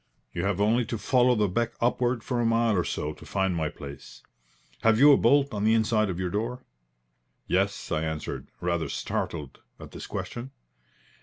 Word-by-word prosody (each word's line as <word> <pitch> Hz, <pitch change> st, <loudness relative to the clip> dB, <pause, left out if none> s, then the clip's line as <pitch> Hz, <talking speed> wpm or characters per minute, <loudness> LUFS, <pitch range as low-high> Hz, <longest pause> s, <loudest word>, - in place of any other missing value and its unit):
You 90 Hz, +2 st, -2 dB
have 100 Hz, -1 st, 0 dB
only 110 Hz, +4 st, +3 dB
to 115 Hz, 0 st, -3 dB
follow 125 Hz, +3 st, +3 dB
the 105 Hz, -2 st, +2 dB
beck 120 Hz, +5 st, -1 dB
upward 120 Hz, 0 st, +1 dB
for 125 Hz, -2 st, -1 dB
a -, -, +1 dB
mile 115 Hz, -1 st, +2 dB
or 90 Hz, -, +2 dB
so 75 Hz, +1 st, -3 dB
to -, -, -15 dB
find 95 Hz, -2 st, 0 dB
my 80 Hz, -2 st, -1 dB
place. 70 Hz, -1 st, -11 dB, 0.6 s
Have 115 Hz, -1 st, +4 dB
you 145 Hz, +4 st, +8 dB
a -, -, +7 dB
bolt 140 Hz, -1 st, +3 dB
on 105 Hz, -1 st, -2 dB
the 110 Hz, +1 st, +4 dB
inside 110 Hz, -1 st, +2 dB
of 90 Hz, -1 st, -3 dB
your 90 Hz, -1 st, -2 dB
door?" 120 Hz, +5 st, -3 dB, 0.8 s
"Yes," 100 Hz, +2 st, 0 dB
I 80 Hz, -1 st, +1 dB
answered, 80 Hz, -2 st, -4 dB
rather 85 Hz, -3 st, -1 dB
startled 75 Hz, -2 st, -4 dB, 0.2 s
at -, -, -10 dB
this -, -, -8 dB
question. 120 Hz, +2 st, -5 dB
105 Hz, 185 wpm, -27 LUFS, 90-120 Hz, 0.8 s, you